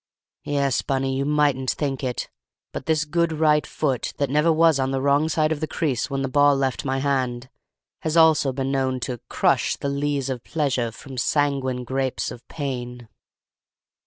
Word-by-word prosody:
Yes, 140 -3 +1
Bunny, 135 -1 -1
you 135 +1 -1
mightn't 145 -3 +1
think 140 -3 -2
it, 125 -2 -2 0.5
but - - -6
this 155 -2 +2
good 170 +2 +1
right 150 -1 +2
foot, 135 -5 -2
that 140 -2 -1
never 150 +3 +3
was 160 -2 +4
on 130 0 +1
the 135 0 -1
wrong 140 +3 +2
side 155 -1 +1
of 155 - -1
the 155 - -2
crease 140 -7 -1
when 135 -1 -2
the - - 0
ball 145 +2 +4
left 135 -2 -1
my 135 -1 -1
hand, 130 -2 -1 0.5
has 160 +1 -1
also 160 -4 +5
been 135 +1 -2
known 130 -1 0
to 125 0 -4
'crush - - +1
the 140 - -3
lees 140 -1 -1
of 130 -3 -4
pleasure 130 -7 -1
From 130 +2 -8
sanguine 135 -2 0
grapes 130 +1 -2
of 120 - -9
pain. 125 -5 -5
140 Hz, 180 wpm, -23 LUFS, 130-150 Hz, 0.5 s, also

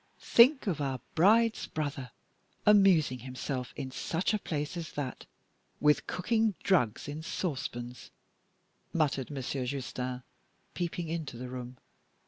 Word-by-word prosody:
"Think 260 +4 +5
of 175 -8 -1
our 135 -2 -1
bride's 220 +6 +4
brother 145 -4 -3 0.6
amusing 190 -11 +5
himself 130 +1 -4
in 135 -2 -5
such 170 +10 -1
a 215 - +1
place 150 -3 -3
as 170 -2 -6
that 140 -3 -5 0.5
with 150 0 +3
cooking 220 +2 +1
drugs 135 - +2
in 145 +2 -5
saucepans," 130 -8 -4 0.8
muttered 140 -5 +1
Monsieur 135 -2 -3
Justin, 125 -1 -4 0.5
peeping 175 -1 -3
into 155 -6 -4
the 125 +1 -6
room. 125 0 -7
145 Hz, 120 wpm, -30 LUFS, 130-180 Hz, 0.8 s, Think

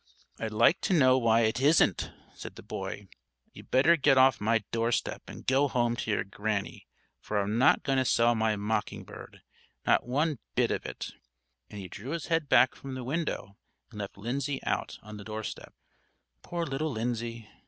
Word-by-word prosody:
"I'd 110 -1 -3
like 115 - +4
to - - 0
know 130 -4 +5
why 115 -1 +4
it 115 +2 +1
isn't," 150 +4 +3 0.2
said - - -9
the - - -11
boy. - - -6 0.5
"You'd - - -13
better 150 +6 +5
get 140 -3 +3
off 130 -3 +5
my 115 +1 +2
doorstep 115 +1 -1
and - - -10
go 135 +2 +3
home 120 -2 +1
to - - -4
your 105 - +1
Granny, 100 0 -4 0.3
for 105 - -2
I'm 105 +3 -1
not 130 - +4
going 135 -1 +1
to 130 - +1
sell 120 -1 +4
my 110 -1 +1
mocking 105 +1 -2
bird, - - -12 0.4
not - - +3
one 145 +2 0 0.2
bit - - +2
of - - -2
it;" - - -6 0.6
and 105 - -8
he 95 - -7
drew 115 - -7
his 170 0 -5
head 165 -3 0
back 130 - +5
from 135 -1 -8
the 130 - -5
window 135 - -3 0.3
and 105 - -9
left 100 -1 -6
Lindsay 135 +6 -2
out - - -2
on 105 0 -9
the 100 - -9
doorstep. 110 +1 -6 0.7
Poor 170 -1 -3
little 145 +3 -2
Lindsay! 115 -1 -3
120 Hz, 185 wpm, -29 LUFS, 110-135 Hz, 0.7 s, know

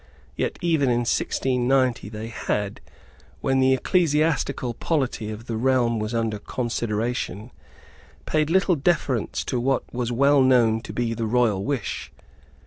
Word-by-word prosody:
Yet, - - -2
even 160 -6 +2
in 120 0 +2
1690, 125 -1 +1
they 110 +1 -6
had, 105 -3 -3 0.6
when 135 0 +1
the 130 0 +4
ecclesiastical 150 -5 +1
polity 130 -6 -1
of 110 +2 -7
the 115 -3 -3
realm 120 -2 +2
was 110 +2 -3
under 115 -2 -1
consideration, 115 -1 -3 0.7
paid 155 -1 +1
little 190 +1 +3
deference 140 - 0
to 125 - -1
what 135 +3 +1
was 120 -1 -2
well 140 +3 +4
known 120 -4 +4
to - - -8
be 120 -1 -1
the 115 -1 -2
royal 110 -4 +2
wish. 140 -1 -3
125 Hz, 135 wpm, -24 LUFS, 115-135 Hz, 0.7 s, the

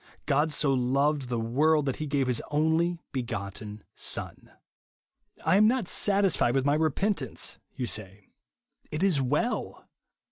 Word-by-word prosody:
" - - -36
God 150 +2 +2
so 145 -2 +2
loved 135 +2 +1
the 120 -2 -1
world 145 +7 +2
that 135 - -2
he 155 - -4
gave 140 -2 +1
his 125 -2 0
only 160 +3 +1
begotten 105 -4 -5
Son." - - -2 0.5
" - - -27
I 190 - +4
am 215 +1 +6
not 240 -4 +1
satisfied 195 -13 +2
with 135 0 +1
my 145 - +3
repentance," 155 - -1 0.2
you 125 - -2
say. 100 -2 -5 0.6
It 155 +4 -3
is 175 -8 +3
well. 150 - -1
145 Hz, 150 wpm, -28 LUFS, 125-160 Hz, 0.6 s, am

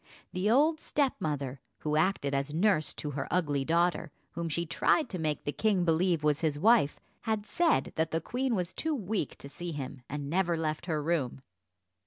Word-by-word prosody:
The 185 +3 0
old 305 +7 +4
stepmother, 145 - -1 0.2
who 150 0 0
acted 155 -3 +1
as 140 +2 -1
nurse 180 -3 +2
to 150 - -4
her 140 0 -3
ugly 145 -6 +1
daughter, 170 +2 +1 0.2
whom 170 0 -3
she 170 +2 -1
tried 255 - +2
to 185 - -4
make 155 -2 -1
the 145 - -1
king 195 0 +1
believe 165 -1 +2
was 150 -1 +3
his 155 -3 0
wife, 210 -3 +4 0.3
had 220 -2 0
said 335 +8 +1
that 160 0 +1
the 165 - 0
queen 245 - -1
was 180 -2 -2
too 320 -1 -1
weak 205 - -2
to - - -10
see 175 +4 -6
him, 135 -2 -6
and 145 0 -4
never 170 +1 +1
left 155 +1 -2
her 155 -3 -1
room. 145 -6 -1
165 Hz, 190 wpm, -30 LUFS, 150-195 Hz, 0.3 s, old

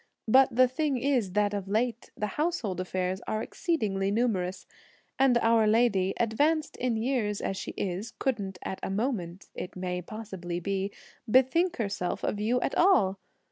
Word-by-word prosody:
But 260 +1 +5
the 255 +1 +6
thing 275 +2 -1
is 245 -7 0
that, 205 0 +2
of 200 -2 -3
late, 230 +3 -1
the 210 - -1
household 230 - -2
affairs 185 +1 -2
are 215 +1 -1
exceedingly 210 - -1
numerous, 200 -5 0 0.5
and 265 -3 +5
our 225 -1 +4
lady, 210 -4 +3
advanced 295 +7 +1
in 245 -2 0
years 220 -4 0
as 195 - -2
she 190 - -6
is, 195 +4 -3
couldn't 200 -8 -2
at 190 - -4
a - - -3
moment, 195 -4 -3
it 180 - -7
may 180 -1 -3
possibly 185 -4 -6
be, 195 +2 -2 0.4
bethink 265 +9 +4
herself 200 -5 -2
of 205 - -1
you 230 +4 +1 0.2
all! 200 - +4
215 Hz, 155 wpm, -28 LUFS, 190-250 Hz, 0.5 s, the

